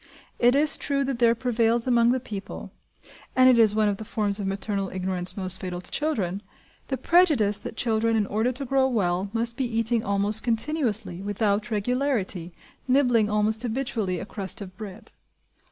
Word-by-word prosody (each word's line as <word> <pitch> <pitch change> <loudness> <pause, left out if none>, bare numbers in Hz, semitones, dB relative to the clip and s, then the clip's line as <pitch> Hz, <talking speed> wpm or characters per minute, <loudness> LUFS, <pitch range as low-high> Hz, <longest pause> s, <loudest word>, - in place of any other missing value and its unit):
It 245 +2 +4
is 295 +1 +4
true 275 -1 -1
that 265 -3 -3
there 235 -1 +4
prevails 235 -1 +3
among 240 -2 +3
the 260 - 0
people 210 -5 -8 0.6
(and 255 0 +6
it 250 -2 +5
is 215 -2 +4
one 215 -1 +2
of 200 -1 -1
the 220 - -7
forms 210 -1 -1
of 200 - -3
maternal 195 0 -3
ignorance 185 0 -2
most 185 -1 -2
fatal 180 -1 -5
to 180 - -10
children) 205 - -1 0.5
the 265 - -2
prejudice 260 - +3
that 220 - -9
children 225 -1 +1
in 215 -2 +1
order 220 +5 0
to 265 +2 -5
grow 265 +1 +2
well 195 -5 -1
must 230 +1 0
be 265 - -1
eating 230 0 +1
almost 200 +2 +2
continuously, 230 - 0
without 205 +2 -1
regularity, 215 -5 -2 0.4
nibbling 245 -5 +3
almost 210 +1 +1
habitually 225 -7 -2
a - - -6
crust 200 +1 -4
of 185 -2 -9
bread. 210 +2 -8
220 Hz, 175 wpm, -25 LUFS, 200-245 Hz, 0.6 s, and